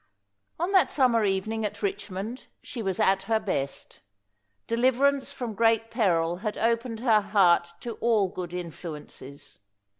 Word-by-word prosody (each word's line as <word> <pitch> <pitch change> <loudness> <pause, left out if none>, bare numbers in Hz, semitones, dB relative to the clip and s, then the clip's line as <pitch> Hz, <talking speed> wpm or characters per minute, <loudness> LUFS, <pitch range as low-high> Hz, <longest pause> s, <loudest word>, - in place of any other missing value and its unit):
On 350 +3 -1
that 380 -2 +4
summer 245 -5 +3
evening 205 +3 -1
at 210 0 -4
Richmond 200 +4 -4 0.2
she 240 - -6
was 195 -1 -2
at 195 -2 +3
her 220 -1 +3
best. 140 -10 -4 0.7
Deliverance 260 +4 +2
from 240 -3 -5
great 225 +1 +2
peril 175 -7 +1
had 210 +2 -4
opened 230 0 0
her 225 -4 +4
heart 195 -4 +3
to 240 - -5
all 220 -4 +3
good 180 -1 -6
influences. 150 -5 -8
215 Hz, 140 wpm, -27 LUFS, 185-230 Hz, 0.7 s, that